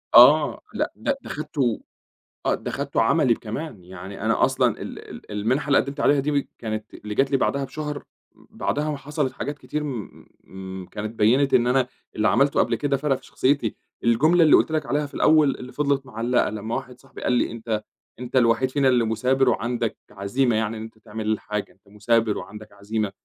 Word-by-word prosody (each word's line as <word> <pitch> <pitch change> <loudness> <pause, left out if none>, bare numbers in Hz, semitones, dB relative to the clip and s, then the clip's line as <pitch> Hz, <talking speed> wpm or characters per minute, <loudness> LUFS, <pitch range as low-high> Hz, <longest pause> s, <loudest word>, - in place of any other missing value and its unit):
آه، 145 +6 +7
لأ، - - -2
لأ 280 - -1
ده - - -7
اخدته 140 -6 -1 0.6
آه - - +3
ده - - -6
اخدته - - -1
عملي 120 -3 +3
كمان، 110 - -6
يعني 95 +2 -9
أنا 110 +1 +3
أصلًا - - +1
ال - - -6
ال - - -11
المنحة 120 +8 0
اللي 140 - +4
قدمت 140 +1 -3
عليها 145 0 +4
دي 140 0 0
كانت 110 -1 -5
اللي 105 0 -7
جات 135 +3 +2
لي 135 - +4
بعدها 140 +1 0
بشهر، 150 +1 -5 0.3
بعدها 150 +1 -3
حصلت 145 -2 -2
حاجات 145 +2 -4
كتير 150 0 -4
م 95 -7 -8
كانت 105 +1 -4
بينت 130 +6 +3
إن 120 - +4
أنا 125 0 +3 0.3
اللي 110 - +2
عملته 140 +1 +3
قبل - - +2
كده 140 -1 0
فرق 140 0 +1
في - - -18
شخصيتي، 130 -5 0 0.3
الجملة 155 +10 +4
اللي 155 - +7
قُلت - - +3
لك 155 -2 0
عليها 145 +4 0
في 145 - -12
الأول 155 -3 +4
اللي 125 - -9
فضلت 140 0 0
معلقة، 120 0 0
لمّا 110 +2 -4
واحد 125 -1 -6
صاحبي 135 - -13
قال - - +2
لي: 125 - +1
"أنت 110 -2 -3 0.4
أنت 125 +1 -7
الوحيد 125 +1 +3
فينا 140 -1 +2
اللي 125 -2 +3
مثابر 125 +4 +2
وعندك 120 -1 -1
عزيمة 110 +5 0
يعني 110 0 -1
إن - - -6
أنت 110 0 -11
تعمل 110 -1 -7
الحاجة 105 -1 -2
أنت 100 +1 -30
مثابر 110 +1 +1
وعندك 105 0 -9
عزيمة" 100 0 -3
125 Hz, 190 wpm, -24 LUFS, 110-140 Hz, 0.6 s, آه